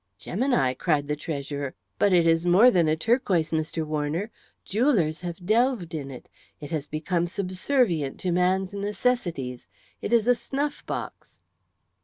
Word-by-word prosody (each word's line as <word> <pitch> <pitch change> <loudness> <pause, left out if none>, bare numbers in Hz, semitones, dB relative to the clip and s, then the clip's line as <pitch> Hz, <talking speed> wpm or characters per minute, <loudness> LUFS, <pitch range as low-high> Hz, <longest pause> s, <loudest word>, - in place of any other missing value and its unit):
"Gemini!" 200 - 0
cried 145 +1 0
the 150 - -1
treasurer. 145 -3 -5 0.2
"But 205 - +4
it 175 -2 +4
is 165 0 +3
more 190 +8 +6
than 170 -6 +3
a 155 - +3
turquoise, 190 -4 +1
Mr. 160 0 -1
Warner. 155 +7 -2 0.3
Jewellers 195 - +1
have 175 0 -6
delved 225 -4 +1
in 145 -4 -4
it. 130 -2 -10 0.3
It 145 +1 -9
has 155 -3 -2
become 170 +3 -1
subservient 185 - 0
to 185 - 0
man's 185 +2 +1
necessities. 200 - -2 0.3
It - - -4
is 235 -1 +3
a 245 - +6
snuff 280 +4 -3
box." - - -6
175 Hz, 150 wpm, -26 LUFS, 155-210 Hz, 0.3 s, more